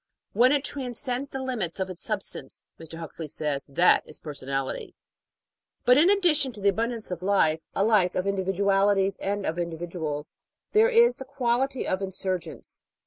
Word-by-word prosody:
When 245 +5 +5
it 285 -1 +2
transcends 260 0 +1
the 265 0 -5
limits 215 -10 -2
of 190 - -1
its 185 -2 -5
substance, - - -1 0.2
Mr. 165 0 -9
Huxley 165 -1 -6
says, 150 -1 -1
that 170 +6 +4
is - - -3
personality. 135 -3 -5 0.9
But 250 +2 +6
in 335 +5 +5
addition 330 -9 +3
to 210 - -9
the 200 0 +3
abundance 225 +1 -1
of 180 -1 -4
life 180 -5 +2
alike 200 -3 +2
of 185 - -1
individu 195 -1 -1
alities 195 0 +3
and 200 0 -2
of 165 +2 -2
individuals 165 -3 -5 0.4
there 440 +2 +5
is 475 0 +4
the 265 - -7
quality 265 0 -1
of 185 - -1
insurgence. 185 -3 -3
195 Hz, 160 wpm, -26 LUFS, 170-255 Hz, 0.9 s, But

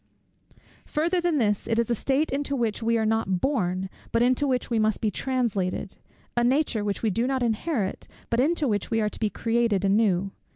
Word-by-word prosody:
Farther 340 +4 0
than 340 -3 +1
this, 210 -5 +1
it 225 -1 0
is 235 0 +1
a - - +4
state 275 +6 0
into 280 0 -1
which 230 -4 -1
we 230 +1 +2
are 220 - +1
not 215 -4 +1
born, 190 -8 0 0.2
but 230 +1 +3
into 255 +3 +2
which 255 -2 -1
we 230 - +2
must 215 0 +1
be 215 - 0
translated; 210 -8 -2 0.4
a 240 - +2
nature 255 -3 +1
which 205 +1 -3
we 220 - +2
do 230 +5 0
not 265 -2 0
inherit, 225 - -1 0.2
but 230 - +2
into 305 +2 +2
which 205 -4 -1
we 225 - +1
are 210 -1 +1
to - - -9
be 215 - +1
created 230 -3 0
anew. 195 -2 +2
230 Hz, 205 wpm, -26 LUFS, 210-265 Hz, 0.4 s, a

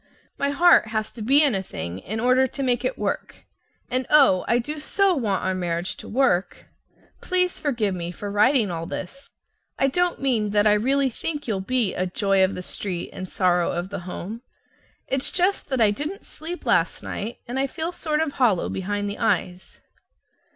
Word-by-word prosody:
My 280 - +1
heart 310 -3 +5
has 215 -1 -3
to 230 - -9
be 275 +7 +5
in 285 -5 +3
a 195 - 0
thing 85 - -6
in 220 - -5
order 255 +2 +4
to 275 +2 -5
make 245 -2 +1
it - - -1
work, - - -4 0.4
and, 255 0 -1
oh, 275 -12 +5
I 235 - +3
do 295 +6 -4
so 390 +5 +2
want 220 - -1
our 190 - 0
marriage 175 -1 -2
to - - -10
work! 230 -7 +1 0.6
Please 365 -1 0
forgive 235 -9 0
me 170 -1 -4
for 200 +3 -6
writing 215 0 +3
all 165 -1 -4
this. 275 +10 -7 0.5
I - - +2
don't 355 +5 0
mean 240 -6 +1
that 205 - +4
I 210 - +6
really 265 +5 +2
think 295 +4 -4
you'll 200 -4 -1
be 235 -1 0
a 185 - -1
"joy 195 +1 +2
of 190 - +1
the 180 - -6
street, 180 -2 -4
and 185 -1 -7
sorrow 180 -2 +2
of 175 +2 -3
the 200 - -5
home." 185 +5 -7 0.7
It's 270 0 +1
just 370 0 0
that 265 -2 -1
I 215 -3 +5
didn't 300 - -5
sleep 340 +3 -8
last - - +1
night, 220 +4 -5
and 250 +3 -3
I 275 - +1
feel 320 +5 -4
sort 310 -3 -1
of 320 -2 0
hollow 230 -10 +2
behind 205 +2 -2
the 205 - -5
eyes. 180 +1 -1
230 Hz, 195 wpm, -24 LUFS, 190-280 Hz, 0.7 s, I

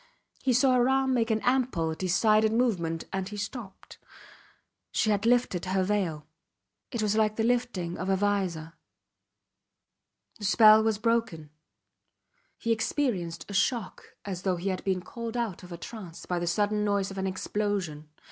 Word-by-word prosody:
He 265 - +1
saw 255 +2 +4
her 250 0 +3
arm 265 0 +2
make 230 -2 +1
an 220 -1 +1
ample, 245 -11 +1
decided 215 +5 +3
movement 185 -9 0
and 190 0 -2
he 210 - -7
stopped. 205 -1 -7 0.9
She 215 - +1
had 205 +2 +1
lifted 240 -8 +2
her 185 0 +1
veil. 185 -7 -1 0.6
It 235 -3 -2
was 210 0 +1
like 215 -1 +2
the 225 - 0
lifting 235 -8 -1
of 185 +2 -3
a 195 - +3
vizor. 185 -5 -1 1.7
The 205 - -5
spell 215 +1 +7
was 220 -1 +1
broken. 220 -9 -1 1.1
He 230 - -2
experienced 220 - -1
a 200 - -8
shock 205 +1 -1
as 185 -3 -4
though 185 -1 0
he 180 +3 -3
had 185 -1 -3
been 190 -2 0
called 230 +4 -6
out 230 -7 -2
of 180 -1 -12
a 170 - -6
trance 180 -3 -9
by 180 -1 -1
the 175 - -3
sudden 210 +4 +1
noise 200 -1 0
of 195 - -6
an 190 - -1
explosion. 185 -5 -3
205 Hz, 165 wpm, -28 LUFS, 180-230 Hz, 1.7 s, spell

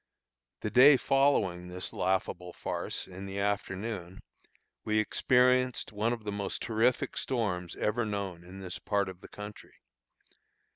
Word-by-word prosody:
The 105 - -2
day 135 +4 +8
following 125 -12 +2
this 90 +1 -4
laughable 90 -1 -1
farce, - - -3
in 95 +1 -8
the 95 0 -6
afternoon, 100 -2 -3 0.6
we 110 0 +1
experienced 125 +3 +3
one 105 +2 0
of 120 -2 -3
the 105 - -3
most 100 -1 -3
terrific 120 +4 +1
storms 95 -9 -2
ever 110 +3 0
known 100 -5 -3
in 95 +2 -10
this 90 -1 -6
part 100 -2 0
of 95 -1 -10
the - - -11
country. 105 0 -10
105 Hz, 140 wpm, -30 LUFS, 95-115 Hz, 0.6 s, day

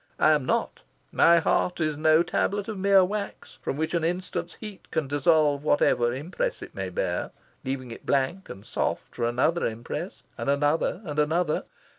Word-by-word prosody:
I 155 - +5
am 145 -4 +1
not. - - 0 0.3
My 170 0 +5
heart 175 +2 +1
is 155 -2 0
no 155 +2 +4
tablet 200 +3 -1
of 220 - -4
mere 195 -1 +5
wax, 205 +2 -6
from 135 - -3
which 160 +2 -2
an 170 -2 +1
instant's 180 0 -3
heat 210 -3 -10
can 160 -3 -1
dissolve 145 0 +2
whatever 120 -5 +3
impress 180 - -3
it - - -11
may - - -4
bear, - - -2 0.3
leaving 130 -2 -4
it - - -9
blank 140 +8 0
and 100 +1 -9
soft - - -2
for - - -2
another 135 +8 +1
impress, 115 +1 -4 0.2
and - - -2
another, 145 +7 +1
and 150 -2 -3
another. 155 +2 +1
155 Hz, 175 wpm, -26 LUFS, 140-180 Hz, 0.3 s, I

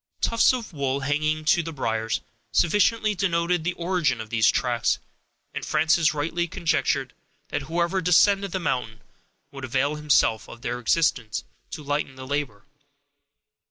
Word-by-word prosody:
Tufts 230 - +4
of 240 -7 -5
wool, 140 -2 -1
hanging 155 +2 -1
to 165 +2 +4
the 165 0 -6
briers, 115 -6 -2 0.3
sufficiently 210 +4 +2
denoted 175 -2 0
the 180 +2 -1
origin 170 -7 0
of 110 -1 -8
these 110 -2 +4
tracks, - - +1 0.6
and - - -5
Frances 160 0 +2
rightly 165 +3 -2
conjectured 170 -1 0 0.4
that - - -2
whoever 170 +5 -1
descended 195 +3 +4
the 190 - -2
mountain, 120 -9 -2 0.5
would 135 -1 -9
avail 135 +3 0
himself 140 -7 +2
of 120 - -12
their 120 +1 -3
existence, 125 -4 +1 0.3
to 150 - -7
lighten 145 -1 -2
the 130 0 -9
labor. 135 -7 -3
155 Hz, 145 wpm, -25 LUFS, 130-175 Hz, 0.6 s, Tufts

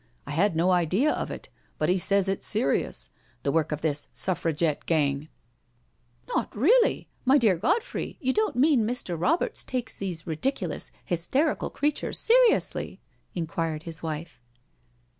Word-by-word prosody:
I 140 - -6
had 175 +4 +2
no 175 +3 +3
idea 185 - +2
of - - -2
it, - - -8 0.3
but - - 0
he 185 +1 +2
says 200 +2 +2
it's 195 0 -1
serious^ 135 - -1 0.3
the - - +1
work 160 -1 +1
of 150 0 -3
this 150 -2 -1
Suffragette 165 -4 -1
gang 145 -2 +1 0.5
'* 120 0 -39
"Not - - -1
really? 455 - +3 0.2
My 270 +2 +5
dear 220 -8 +4
Godfrey, 395 - -1
you 260 0 0
don't 430 -1 +1
mean 270 0 +4
Mr. 220 -5 -2
Roberts 275 - 0
takes 250 -2 -3
these 180 -4 -4
ridiculous, 175 - -2 0.2
hysterical 205 - 0
creatures 295 +1 -1
seriously?" 480 0 +3 0.4
inquired 165 -2 -2
his 165 -1 -6
wife. 160 -3 -5
180 Hz, 145 wpm, -27 LUFS, 160-260 Hz, 0.5 s, My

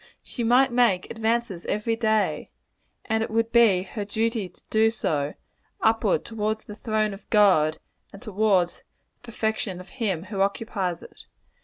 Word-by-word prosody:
She 240 - -5
might 250 +3 +4
make 235 -7 +2
advances 225 -4 -1
every 225 +2 0
day 220 -2 0 0.6
and 220 0 0
it 225 - -2
would 225 +1 0
he 220 -6 +5
her 205 +2 -5
duty 220 -1 -1
to 175 - -27
do 220 0 +4
so 150 -10 -2 0.4
upward 225 0 +2
toward 220 -1 -2
the 210 - -10
throne 215 -2 -1
of 195 - -13
God, 185 -8 +4 0.3
and 200 - -11
towards 200 -5 +1
the - - -35
perfection 220 -5 -3
of 185 - -12
him 200 -10 -2
who 195 0 -4
occupies 195 -3 -1
it. - - -14
215 Hz, 155 wpm, -25 LUFS, 195-225 Hz, 0.6 s, he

